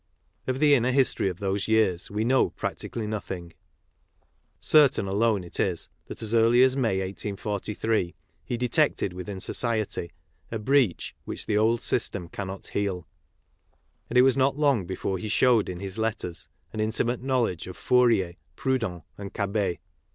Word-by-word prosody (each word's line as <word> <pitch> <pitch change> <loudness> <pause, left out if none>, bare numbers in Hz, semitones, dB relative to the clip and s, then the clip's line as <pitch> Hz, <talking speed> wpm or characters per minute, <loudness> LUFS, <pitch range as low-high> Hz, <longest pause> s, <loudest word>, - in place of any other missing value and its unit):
Of 130 0 0
the 145 +1 +5
inner 125 -2 +3
history 130 -6 +2
of 90 - -6
those 100 0 -2
years 110 -6 +2
Ave 105 +2 -1
know 130 +3 +3
practically 115 - -4
nothing. 95 -5 -5 1.1
Certain 145 -9 +4
alone 105 0 +1
it 85 - -7
is 90 -4 0 0.2
that - - -6
as 110 0 0
early 115 +2 +5
as 130 0 +4
May, 115 -8 +1
1843, 100 0 -2 0.3
he 120 - -3
detected 125 - +1
within 95 +2 -6
society 110 -5 -1 0.2
" - - -37
a 115 - -2
breach 120 -3 +1
which - - -5
the 105 - 0
old 115 +2 +2
system 100 -7 0
cannot 95 0 -6
heal 95 -5 -2 0.3
' - - -44
'; - - -43
and 125 - 0
it 125 - +8
was 130 -1 +4
not 135 +1 +2
long 140 - +2
before 95 0 -3
he 105 - -5
showed 115 -2 +3
in 90 -1 -5
his 95 +2 -6
letters 110 -6 -3 0.3
an 110 - -5
intimate 115 +3 0
knowledge 125 -10 0
of 90 - -8
Fourier, 115 -9 +3 0.2
Proudhon 115 - -1 0.2
and 100 -1 -8
Cabet. 100 -3 -1
110 Hz, 165 wpm, -26 LUFS, 95-125 Hz, 1.1 s, it